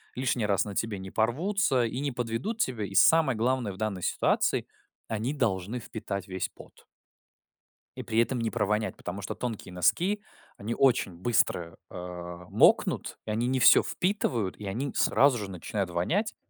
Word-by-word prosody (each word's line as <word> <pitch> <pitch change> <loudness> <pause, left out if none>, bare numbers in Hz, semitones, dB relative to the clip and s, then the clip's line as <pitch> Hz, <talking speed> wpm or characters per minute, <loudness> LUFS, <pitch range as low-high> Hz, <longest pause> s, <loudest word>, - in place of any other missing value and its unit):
лишний 125 -3 0
раз 100 -2 +2
на 100 -2 -6
тебе 110 -1 -1
не 95 0 -8
порвутся 135 - +1
и 115 +3 -3
не 140 0 -1
подведут 120 - -3
тебя. 125 - 0
И 95 - -8
самое 155 -4 +5
главное 120 -1 0
в - - -12
данной 100 -4 -3
ситуации: - - +1 0.4
они 110 +5 -2
должны 110 -4 -1
впитать 105 -4 -5
весь 95 -1 -3
пот. - - -17 1.1
И - - -5
при 110 0 0
этом 120 +2 +2
не 115 -1 -1
провонять, 105 -1 0
потому 100 0 -6
что - - -4
тонкие 110 -6 -5
носки, 180 - +1 0.4
они 110 +4 -4
очень 125 -8 +3
быстро, 85 -4 0
а, 90 -1 -8
мокнут, - - +3
и 110 - -3
они 115 +3 0
не 130 +1 +1
всё 115 - +8
впитывают, 125 - -1
и 105 - -7
они 125 +8 -3
сразу 135 -3 +3
же 100 -2 -5
начинают 95 +1 -3
вонять. 165 - -1
110 Hz, 165 wpm, -28 LUFS, 95-130 Hz, 1.1 s, всё